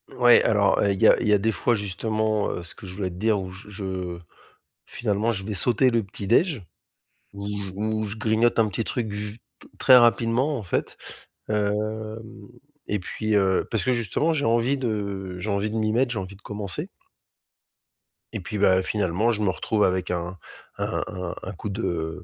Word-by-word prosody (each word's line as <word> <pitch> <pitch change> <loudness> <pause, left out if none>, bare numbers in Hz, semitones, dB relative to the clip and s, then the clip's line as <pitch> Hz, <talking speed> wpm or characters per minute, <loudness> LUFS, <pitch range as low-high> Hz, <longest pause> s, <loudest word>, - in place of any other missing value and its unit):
Ouais 120 -1 +6
alors, 100 -2 +3
heu, 100 -1 +3
il 95 - -6
y - - +7
a - - +6
il 115 - -1
y 105 - +5
a - - +6
des 110 +3 +1
fois 120 +2 +1
justement, 110 +1 -1
heu, 85 - -5
ce 85 - -7
que 95 - -11
je 90 - -9
voulais 95 -2 -2
te 90 - -10
dire 110 +2 +1
où 95 -1 -7
je 95 +3 -11
je 95 -4 -5 0.7
finalement 110 0 -1
je 95 -3 -4
vais 105 - -3
sauter 125 +5 +4
le 115 -2 +1
petit 100 0 -6
déj, 140 - +2 0.7
où 100 0 -7
j 100 -2 -4
où 110 +1 -1
je 105 +2 -5
grignote 110 +2 +2
un 110 -2 +3
petit 105 +3 -3
truc 115 -5 -2
v 105 +1 -5 0.2
t - - -15
très 130 - +7
rapidement, 120 +4 +3
en 115 - -6
fait, 85 - -2 0.5
hem, 105 -1 +1 1.2
et 105 -1 -1
puis, 110 +4 -3
heu, 95 -2 +2
parce 110 - 0
que 130 - +1
justement 120 - +1
j'ai 145 - 0
envie 120 +4 +2
de 100 -6 -3
j'ai 105 - -4
envie 100 +2 0
de 110 - -5
m'y 110 -1 +1
mettre, 125 +2 +2
j'ai 110 - -2
envie 95 +1 -7
de - - -24
commencer 100 -3 -5 1.5
et - - -3
puis 105 - -5
bah 95 -1 +4
finalement, 105 +3 +1
je 105 - -2
me 100 - +2
retrouve 105 +5 0
avec 95 -1 0
un 90 +1 -3 0.4
un - - -1
un 90 -1 -5
un 95 - -5
coup 105 +3 -6
de 85 -4 -3
105 Hz, 205 wpm, -25 LUFS, 95-115 Hz, 1.5 s, y